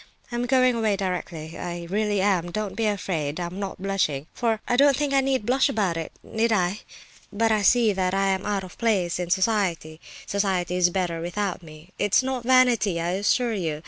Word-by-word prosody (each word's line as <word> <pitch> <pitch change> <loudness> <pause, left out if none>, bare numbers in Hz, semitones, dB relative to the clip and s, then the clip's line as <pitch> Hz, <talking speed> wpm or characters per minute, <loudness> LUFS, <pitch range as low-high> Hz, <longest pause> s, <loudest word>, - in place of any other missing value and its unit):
I'm 240 +1 -2
going 255 -1 +4
away 220 -3 +1
directly, 180 -4 -4
I 175 -1 -5
really 205 +1 0
am—don't 190 +1 -1
be 225 0 0
afraid. 175 -7 -2
I 175 - -2
am 180 +3 -7
not 195 -2 -5
blushing, 185 -8 -1
for 225 -3 0
I 245 - +2
don't 280 +1 +5
think 290 -1 -1
I 275 - +4
need 265 -5 0
blush 260 +4 +3
about 200 -9 0
it, 165 -1 -5
need 225 +1 -1
I? 190 -1 +1 0.5
But 225 +2 +1
I 215 -1 +2
see 225 +1 +4
that 185 0 0
I 195 0 +2
am 190 0 0
out 200 -2 -1
of 185 - -12
place 195 -7 +1
in 175 -1 -3
society—society 185 -1 -1
is 180 -1 +4
better 175 -2 -2
without 185 +2 -3
me. 155 +1 -14
It's 205 +5 +3
not 260 -2 -3
vanity, 240 -8 +3
I 170 +1 -1
assure 225 +5 +1
you. 165 -7 -2
195 Hz, 195 wpm, -24 LUFS, 175-225 Hz, 0.5 s, don't